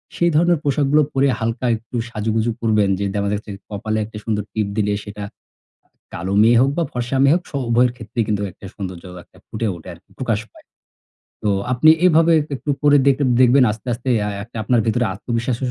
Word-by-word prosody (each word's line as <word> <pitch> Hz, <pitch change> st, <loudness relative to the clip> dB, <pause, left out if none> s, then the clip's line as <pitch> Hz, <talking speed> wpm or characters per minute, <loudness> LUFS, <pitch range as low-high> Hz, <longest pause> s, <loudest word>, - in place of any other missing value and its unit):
সেই 170 Hz, -, +2 dB
ধরনের 170 Hz, 0 st, +3 dB
পোশাকগুলো 145 Hz, +1 st, +2 dB
পরে 135 Hz, +1 st, +3 dB
হালকা 115 Hz, +2 st, -2 dB
একটু 115 Hz, +2 st, -10 dB
সাজুগুজু 110 Hz, +1 st, -1 dB
করবেন। 105 Hz, -3 st, +2 dB
যে 100 Hz, -, -1 dB
দেখা 100 Hz, -1 st, -1 dB
যাচ্ছে 105 Hz, 0 st, -5 dB, 0.2 s
কপালে 110 Hz, +1 st, -3 dB
একটা 110 Hz, 0 st, -10 dB
সুন্দর 105 Hz, -2 st, -1 dB
টিপ 105 Hz, -2 st, -1 dB
দিলে 105 Hz, -1 st, +1 dB
সেটা 105 Hz, 0 st, -8 dB, 0.6 s
কা -, -, -48 dB, 0.2 s
কালো 95 Hz, +3 st, -3 dB
মেয়ে 115 Hz, +1 st, +5 dB
হোক 135 Hz, -, +3 dB
বা, 170 Hz, -, +2 dB
ফর্সা 125 Hz, +1 st, -2 dB
মেয়ে 140 Hz, -, +5 dB
হোক 180 Hz, -, -2 dB
স -, -, -28 dB, 0.2 s
উভয়ের 120 Hz, +1 st, +3 dB
ক্ষেত্রেই 115 Hz, 0 st, -3 dB
কিন্তু 105 Hz, -1 st, -1 dB
একটা 95 Hz, -, -14 dB
সৌন্দর্য 95 Hz, -4 st, -7 dB, 0.2 s
একটা -, -, -24 dB
ফুটে 110 Hz, +1 st, -3 dB
ওঠে 85 Hz, +2 st, -11 dB
আরকি, 85 Hz, +2 st, -19 dB
প্রকাশ 115 Hz, -5 st, 0 dB
পায়। -, -, -19 dB, 0.8 s
তো 105 Hz, -, +1 dB, 0.2 s
আপনি 155 Hz, +6 st, +5 dB, 0.2 s
এভাবে 165 Hz, -1 st, +5 dB
এক 150 Hz, -, -7 dB
একটু 140 Hz, -, -7 dB
করে 145 Hz, -1 st, +5 dB
দেখ-দেখবেন 130 Hz, -1 st, +4 dB
আস্তে, 115 Hz, +4 st, -10 dB
আস্তে 120 Hz, +2 st, -4 dB, 0.2 s
আএ 100 Hz, -, -4 dB
একটা 115 Hz, +2 st, -11 dB
আপনার 120 Hz, +3 st, +2 dB
ভেতরে 120 Hz, +2 st, +1 dB
আত্মবিশ্বাস 115 Hz, +4 st, -2 dB
115 Hz, 195 wpm, -20 LUFS, 105-130 Hz, 0.8 s, মেয়ে